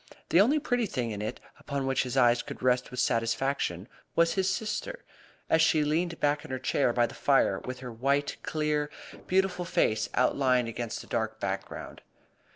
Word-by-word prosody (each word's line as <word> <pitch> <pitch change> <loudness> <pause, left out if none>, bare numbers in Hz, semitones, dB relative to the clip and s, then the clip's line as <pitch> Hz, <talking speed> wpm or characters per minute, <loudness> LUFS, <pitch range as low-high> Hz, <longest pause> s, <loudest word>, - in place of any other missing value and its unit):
The 175 - +6
only 265 +9 +4
pretty 245 -6 0
thing 125 - -2
in 105 -1 -4
it, 105 - -4 0.2
upon 140 -2 -3
which 135 0 +1
his 130 0 -3
eyes 120 -2 +5
could 140 -1 -9
rest 125 0 +2
with 125 - -6
satisfaction, 115 -5 0 0.3
was 170 0 +4
his 190 -1 +1
sister, 225 - -3 0.4
as 160 - +3
she 160 -1 +4
leaned 165 +3 0
back 145 0 +1
in - - -11
her 130 - -2
chair 130 0 +1
by 120 0 +3
the - - -7
fire 140 -1 +2
with 130 0 -7
her 125 -1 -6
white, 140 +5 0
clear 150 -1 -1 0.4
beautiful 185 -1 +1
face 110 -9 +1
outlined 125 -1 +2
against 115 0 -4
the - - -14
dark 110 0 -2
background. 95 0 -5
135 Hz, 180 wpm, -29 LUFS, 120-165 Hz, 0.4 s, The